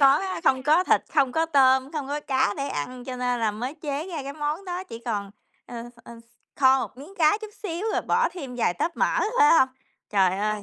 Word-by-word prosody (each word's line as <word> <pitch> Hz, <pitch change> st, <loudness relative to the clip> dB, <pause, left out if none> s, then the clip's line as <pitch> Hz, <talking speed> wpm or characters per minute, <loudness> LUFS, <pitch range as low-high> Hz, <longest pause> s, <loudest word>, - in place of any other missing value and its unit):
có 275 Hz, -, +8 dB
á 375 Hz, -3 st, -4 dB
không 260 Hz, -2 st, +3 dB
có 315 Hz, +6 st, +4 dB
thịt, -, -, +3 dB
không 275 Hz, -5 st, +3 dB
có 325 Hz, 0 st, +1 dB
tôm, 265 Hz, -2 st, +3 dB
không 295 Hz, -4 st, -3 dB
có 295 Hz, +1 st, -2 dB
cá 265 Hz, -7 st, +1 dB
để 275 Hz, 0 st, -3 dB
ăn, 245 Hz, +13 st, -5 dB
cho 255 Hz, -1 st, -6 dB
nên 250 Hz, -1 st, -1 dB
là 220 Hz, -, +2 dB
mới 245 Hz, +7 st, -5 dB
chế 295 Hz, +1 st, -4 dB
ra 320 Hz, -6 st, -5 dB
cái 280 Hz, +1 st, -6 dB
món 300 Hz, +5 st, -3 dB
đó, 365 Hz, 0 st, -4 dB
chỉ 230 Hz, -10 st, -9 dB
còn 205 Hz, -4 st, -3 dB, 0.4 s
ờ, 235 Hz, -1 st, -7 dB, 0.2 s
ờ, 235 Hz, -, -11 dB, 0.4 s
kho 265 Hz, -1 st, +5 dB
một -, -, -6 dB
miếng 300 Hz, +9 st, -12 dB
cá 310 Hz, +5 st, +4 dB
chút 435 Hz, -, -8 dB
xíu 350 Hz, -1 st, -4 dB
rồi -, -, 0 dB
bỏ -, -, +2 dB
thêm 275 Hz, -9 st, -8 dB
vài 180 Hz, -7 st, +1 dB
tóp 335 Hz, -, -2 dB
mỡ, -, -, +1 dB, 0.2 s
phải 440 Hz, -1 st, +7 dB
hông? 260 Hz, -, +4 dB, 0.4 s
Trời 190 Hz, -2 st, +2 dB
ơi. 210 Hz, 0 st, -1 dB
275 Hz, 235 wpm, -25 LUFS, 245-315 Hz, 0.4 s, có